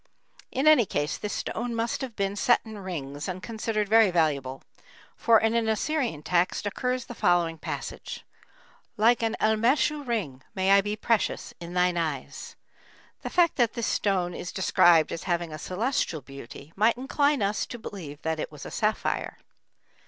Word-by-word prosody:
In 265 +3 -1
any 295 -9 +6
case 145 -1 -1
this 210 - -5
stone 235 +1 -3
must 230 0 -1
have 255 -4 -5
been 200 0 -1
set 240 +3 +4
in 220 -2 -8
rings 145 -6 -5
and 185 0 -5
considered 220 -2 -2
very 220 0 +6
valuable, 145 -6 0 0.5
for 230 -1 +4
in 225 +1 +1
an 230 -1 +1
Assyrian 230 - -1
text 180 +4 +1
occurs 250 +4 -2
the - - -8
following 170 -6 +1
passage: - - -6 0.7
"Like 230 +3 +4
an 225 0 0
elmêshu 235 +7 +2
ring 180 - -2
may 190 0 +2
I 200 0 +7
be 205 +1 -3
precious 220 0 0
in 175 +1 -8
thine 180 -1 +2
eyes." 155 -5 -4 0.7
The - - -4
fact 345 -3 +3
that 240 -4 +2
this 235 - -2
stone 185 -5 0
is 180 - -6
described 175 -3 +4
as 165 - -4
having 170 -3 -1
"a 155 - -6
celestial 185 - -1
beauty" 135 +3 -11
might 220 +4 +3
incline 285 0 +1
us 200 +2 0
to 240 - -7
believe 160 -10 -8
that 160 -1 -1
it - - -4
was 150 -2 -10
a - - -7
sapphire. 215 0 -1
205 Hz, 170 wpm, -27 LUFS, 170-230 Hz, 0.7 s, I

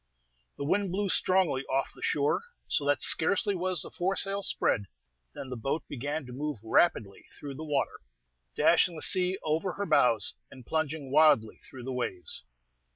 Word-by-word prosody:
The 140 - -4
wind 195 +4 0
blew 200 +2 -1
strongly 180 -9 +1
off 135 +1 -1
the - - -15
shore, 145 0 +1 0.3
so 145 - 0
that 145 -1 +2
scarcely 200 +5 +3
was 185 -3 +2
the - - -9
foresail 195 +2 0
spread 105 - +2 0.5
than 130 - -7
the - - -3
boat 135 +7 -3
began 145 +3 -4
to 125 - -10
move 150 +1 -4
rapidly 110 - +1
through 145 -1 -7
the 150 +4 -8
water, 145 -3 -2 0.6
dashing 175 - +3
the 155 - -3
sea 185 0 +3
over 160 +4 -1
her 200 - -4
bows, 125 - +3 0.2
and 130 -3 -14
plunging 155 -2 -2
wildly 145 -7 +4
through 130 -3 -10
the 130 +1 -5
waves. 95 - -4
150 Hz, 165 wpm, -28 LUFS, 130-180 Hz, 0.6 s, wildly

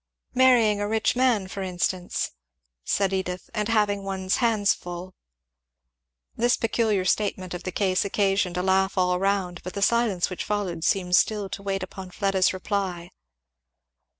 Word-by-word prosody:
"Marrying 240 -5 +4
a 205 - -1
rich 220 +2 +1
man, 245 -6 +2
for 195 +1 -6
instance," 180 -1 -2 0.5
said 195 - 0
Edith, 180 -1 -3
"and 210 -2 -1
having 210 -3 +1
one's 190 -1 -1
hands 220 -5 +3
full." 175 +1 -8 1.2
This 240 +2 +2
peculiar 220 -4 0
statement 185 -2 0
of 175 - -5
the 185 - -4
case 185 0 +1
occasioned 195 -2 0
a 180 - 0
laugh 190 +1 +2
all 180 -1 +2
round, 190 -3 -1
but 180 - -8
the 200 - 0
silence 225 -6 +2
which 185 - -5
followed 190 -6 -2
seemed 180 0 +2
still 210 -3 +1
to 200 - -6
wait 195 -1 -2
upon 190 0 -8
Fleda's 195 0 +1
reply. 185 -2 -3
195 Hz, 150 wpm, -25 LUFS, 185-210 Hz, 1.2 s, Marrying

